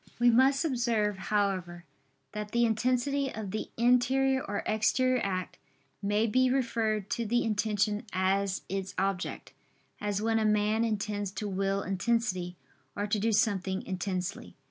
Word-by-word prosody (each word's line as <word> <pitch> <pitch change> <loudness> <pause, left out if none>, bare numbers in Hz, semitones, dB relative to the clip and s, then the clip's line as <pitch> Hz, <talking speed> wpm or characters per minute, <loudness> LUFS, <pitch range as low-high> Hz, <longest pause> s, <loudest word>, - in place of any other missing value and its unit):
We 240 0 +5
must 270 +5 +4
observe, 235 -7 +1
however, 185 -4 -1 0.5
that 210 0 -6
the 235 0 +4
intensity 255 +4 +1
of 210 -3 -6
the 215 - -4
interior 260 +3 +3
or 200 0 -3
exterior 255 +4 +2
act, 185 -2 -3 0.4
may 205 +2 +1
be 255 +3 +3
referred 225 -5 0
to 235 - -1
the 240 +3 +2
intention 210 0 0
as 190 +1 0
its 195 0 -4
object: 195 -1 -2 0.5
as 205 -1 -1
when 225 +1 +1
a - - +1
man 210 +1 +2
intends 210 -2 -2
to 205 +2 -4
will 195 0 -1
intensely, 185 -3 -1 0.4
or 205 - -1
to 210 0 0
do 225 +3 +1
something 195 -3 +1
intensely. 185 0 -4
210 Hz, 145 wpm, -29 LUFS, 195-235 Hz, 0.5 s, We